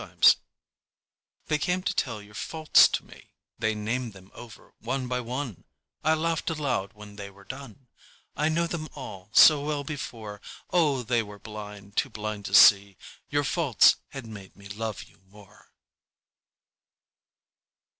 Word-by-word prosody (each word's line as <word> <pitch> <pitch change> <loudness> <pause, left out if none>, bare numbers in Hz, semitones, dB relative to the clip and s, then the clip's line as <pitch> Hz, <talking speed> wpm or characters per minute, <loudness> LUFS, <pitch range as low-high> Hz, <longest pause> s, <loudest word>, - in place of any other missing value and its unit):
Faults - - +5 1.1
They 150 - 0
came 180 +4 -1
to - - -1
tell 110 -5 -2
your 105 0 -17
faults 155 +8 +4
to - - -3
me, - - -17 0.3
They 110 -1 0
named 115 +2 -3
them 95 0 -16
over 120 -3 -13
one 130 +3 -3
by 125 0 -1
one; 125 - -5 0.4
I 155 +1 +3
laughed 165 +1 -1
aloud 135 -11 -2
when 105 -1 -13
they 100 -1 -7
were 100 0 -18
done, 130 +2 -10 0.5
I 150 +3 +1
knew 170 +2 +1
them 165 -2 -5
all 100 -9 -9
so 150 +3 +7
well 145 -1 -2
before, 115 -8 -7 0.3
Oh, 150 -7 +2
they 120 0 +1
were 105 -2 -10
blind, 105 -1 -10
too 135 - +1
blind 110 -2 -5
to - - 0
see 100 -2 +7 0.3
Your 145 0 +1
faults 140 - +4
had 135 -3 -9
made 100 -4 -11
me 100 0 -13
love 110 0 -5
you - - -22
more. 100 0 -19
115 Hz, 155 wpm, -27 LUFS, 105-145 Hz, 1.1 s, so